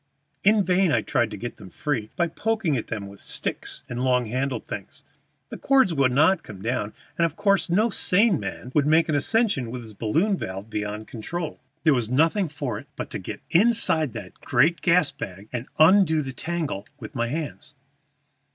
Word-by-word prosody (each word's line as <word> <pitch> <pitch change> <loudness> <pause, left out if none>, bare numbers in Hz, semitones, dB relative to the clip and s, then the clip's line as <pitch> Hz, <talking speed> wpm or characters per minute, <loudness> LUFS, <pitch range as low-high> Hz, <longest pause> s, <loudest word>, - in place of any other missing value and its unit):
In 210 0 +5
vain 185 -1 +3
I - - +2
tried 120 -2 +1
to - - -7
get 120 - -6
them 100 -3 -11
free 130 -2 -3
by 170 - +1
poking 215 -5 -1
at 115 - -3
them 105 -3 -4
with 100 0 -12
sticks - - -3
and 120 +1 -3
long 125 -1 +2
handled 130 +4 -2
things; - - -8 0.5
the - - -7
cords 265 -10 +4
would 135 -4 +3
not 160 +7 +4
come 105 -7 -11
down, 110 -3 -2 0.3
and 170 - +5
of 160 - -10
course 200 -1 +2
no 215 +6 +3
sane 195 -2 +3
man 125 - -6
would 145 -1 +3
make 160 +2 +4
an 155 - +2
ascension 200 - +1
with 125 +1 -6
his 110 -1 -10
balloon 165 - +1
valve 95 - -6
beyond 105 0 -4
control. 155 +8 -5 0.2
There 155 -3 +5
was 120 -4 0
nothing 165 - +2
for 140 -7 -4
it - - -14
but - - -6
to - - -4
get - - -7
inside 170 - +3
that 95 -2 -9
great 150 +6 +2
gas 175 -3 +4
bag 95 +2 -8
and 120 +1 -4
undo 160 -2 +5
the 135 -1 -6
tangle 155 -10 -3
with 110 - -9
my 120 -2 -1
hands. 150 +1 -5
145 Hz, 195 wpm, -25 LUFS, 120-175 Hz, 0.5 s, In